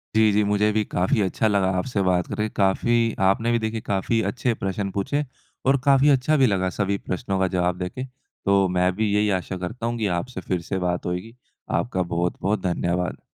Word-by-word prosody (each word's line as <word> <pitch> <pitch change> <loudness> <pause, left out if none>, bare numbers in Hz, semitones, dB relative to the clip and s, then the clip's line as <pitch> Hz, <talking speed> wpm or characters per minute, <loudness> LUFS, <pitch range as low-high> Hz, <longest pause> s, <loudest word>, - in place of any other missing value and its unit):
जी, 110 -1 +5
जी। 105 +1 +3
मुझे 105 +1 +2
भी 110 0 +1
काफ़ी 90 +4 +1
अच्छा 100 +3 +1
लगा 100 -3 +2
आपसे 100 +2 -1
बात 90 -2 +1
करके, 105 0 -2
काफ़ी 115 +4 +2
आपने 115 +5 +2
भी 120 - +2
देखिए 110 0 -3
काफ़ी 100 +3 +1
अच्छे 125 -1 -1
प्रश्न 95 +1 -1
पूछे 100 +10 -1 0.4
और 135 +1 +4
काफ़ी 140 +1 +5
अच्छा 140 +3 +3
भी 135 - +5
लगा 95 -3 +1
सभी 100 -1 +1
प्रश्नों 95 +1 -2
का 95 - +2
जवाब 90 0 +1
देके। 90 +8 -4 0.4
तो 100 -1 +4
मैं 90 +1 +3
भी 105 0 0
यही 105 0 +2
आशा 95 +1 -6
करता 90 +7 -5
हूँ 120 0 -1
कि 110 -2 0
आपसे 105 +1 -5
फ़िर 90 0 -2
से 95 - +1
बात 90 -1 -1
होएगी। 90 +6 -4 0.5
आपका 95 -6 -2
बहुत-बहुत 90 +4 -1
धन्यवाद। 90 -1 -1
100 Hz, 200 wpm, -24 LUFS, 90-115 Hz, 0.5 s, जी